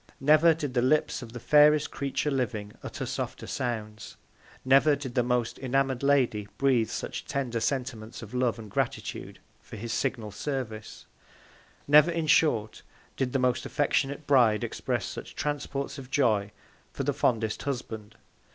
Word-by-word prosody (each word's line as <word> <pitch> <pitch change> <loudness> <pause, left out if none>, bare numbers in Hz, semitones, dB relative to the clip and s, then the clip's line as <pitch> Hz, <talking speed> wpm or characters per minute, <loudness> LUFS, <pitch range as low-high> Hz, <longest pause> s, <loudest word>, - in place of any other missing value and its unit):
Never 155 +4 +5
did 145 -5 -4
the 120 - +2
Lips 150 +3 +1
of 120 -2 -9
the 120 - -7
fairest 150 +3 +5
Creature 140 +1 -2
living 115 -6 -2
utter - - -5
softer - - -4
Sounds; 110 -3 -4 0.5
never 135 +3 +5
did 135 -3 -7
the 125 - +3
most 125 -1 -1
enamoured 135 -1 0
Lady 130 -7 +2
breathe 125 -5 +2
such - - -5
tender 130 -5 -2
Sentiments 115 -2 -3
of 110 - -11
Love 125 -2 +1
and 110 -3 -10
Gratitude - - -3 0.2
for - - -11
his 115 +2 -5
signal 115 -6 -2
Service; 110 -2 -5 0.8
never, 150 +3 +7
in 165 -1 -1
short, 115 -9 +2 0.3
did 130 -2 -1
the 135 - +1
most 125 -1 +1
affectionate 145 0 0
Bride 120 -7 +4
express - - -2
such - - -8
Transports 145 -2 -3
of 130 -2 -10
Joy 110 -7 +2 0.4
for - - -4
the - - 0
fondest 110 -2 0
Husband. 110 -6 -5
130 Hz, 150 wpm, -28 LUFS, 115-140 Hz, 0.8 s, never